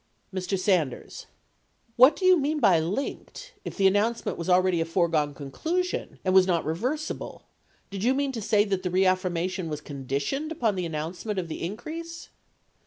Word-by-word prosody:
Mr. 190 +1 -2
Sanders. 180 - -1 0.7
What 260 +5 +7
do 370 - -3
you 370 0 +7
mean 305 -1 0
by 175 - +5
"linked," 275 - -4
if - - -7
the 195 - +2
an 190 - +6
nouncement 225 +3 0
was 170 +1 -5
already 180 -1 +3
a - - 0
foregone 165 -4 +1
conclusion 325 - -3
and 185 - +2
was 190 -1 +6
not 170 -3 +1
re 155 - 0
versible, 275 - -4 0.5
did 195 0 -4
you 255 +3 +3
mean 280 0 0
to 235 -4 -5
say 210 0 +3
that 195 -3 -1
the 185 - -2
reaffirmation 185 -1 0
was 150 -1 -3
con 140 -3 -9
ditioned 145 - -2
upon 235 -9 0
the 180 -2 -2
announcement 165 +6 -4
of 175 -3 -3
the - - -5
increase? 320 - -6
190 Hz, 180 wpm, -26 LUFS, 170-255 Hz, 0.7 s, What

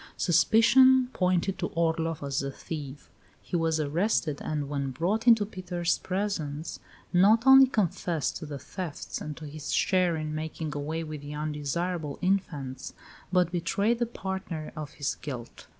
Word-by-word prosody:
Suspicion 245 +9 +5
pointed 185 +1 +1
to 175 - -1
Orloff 165 -2 0
as 140 -1 -1
the 140 - -2
thief; 145 0 -7 0.3
he - - -6
was 165 -1 +1
arrested, 155 0 0
and, 150 -2 -2
when 140 -1 -2
brought 185 - -1
into 225 -3 +6
Peter's 180 -4 -2
presence, 170 -6 -3 0.3
not 210 +6 +5
only 265 0 +9
confessed 180 - -1
to 155 - -8
the 145 -1 -5
thefts 165 +4 -6
and 150 -1 -6
to 155 - -8
his 150 0 -6
share 185 -3 +2
in 155 -1 -3
making 155 0 -4
away 155 +3 -3
with 155 -2 -7
the 145 +1 -7
undesirable 150 +1 -3
infants, 150 -9 -2 0.4
but 180 -2 +3
betrayed 200 +7 0
the 240 - +1
partner 190 -7 -5
of 155 -2 -6
his 145 -1 -2
guilt. 125 -5 -7
165 Hz, 150 wpm, -28 LUFS, 150-190 Hz, 0.4 s, only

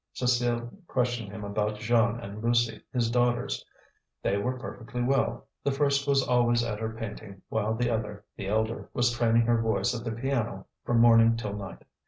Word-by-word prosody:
Cécile 120 -1 0
questioned 120 -5 -1
him 105 0 -7
about 105 +1 -1
Jeanne 115 +1 +2
and 105 -1 -7
Lucie, 120 0 +2
his 120 -3 0
daughters. 120 +2 +1 0.6
They 100 - +1
were 125 +6 -1
perfectly 125 0 -5
well, 135 +2 +1 0.2
the 140 - +1
first 140 0 +1
was 140 -1 +3
always 120 -1 +3
at 110 -3 -3
her 110 0 -2
painting, 105 -3 -8
while 110 0 0
the 120 +1 0
other, 105 -2 -3
the 95 - -5
elder, 110 +2 -1
was 120 -1 +3
training 115 -1 +3
her 115 0 +2
voice 115 +2 +1
at 120 -1 -4
the 115 - -3
piano 115 -4 -2 0.2
from 120 -1 +3
morning 115 -1 +6
till 105 -3 -4
night. 100 -3 -7
115 Hz, 180 wpm, -28 LUFS, 110-120 Hz, 0.6 s, morning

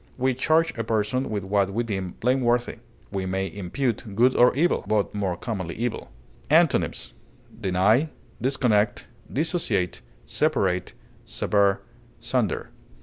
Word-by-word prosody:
We 130 0 +1
charge 160 +6 +2
a - - 0
person 110 +4 0
with 105 -3 -2
what 100 0 +1
we 115 +4 -1
deem 95 -5 -4
blameworthy. 120 -1 +1 0.3
We 95 -2 -2
may 95 +1 -1
impute 105 +2 -3
good 125 +4 +4
or 125 - +6
evil, 170 +5 +2
but 105 -2 +1
more 95 -4 -1
commonly 95 -8 -4
evil. 120 0 -3 0.4
Antonyms: - - +2 0.5
deny, 100 - +3 0.3
disconnect, 120 -5 +1 0.3
dissociate, 135 - -1 0.2
separate, 95 - 0 0.3
sever, 100 -1 +1 0.4
sunder. - - -1
110 Hz, 120 wpm, -25 LUFS, 100-130 Hz, 0.5 s, or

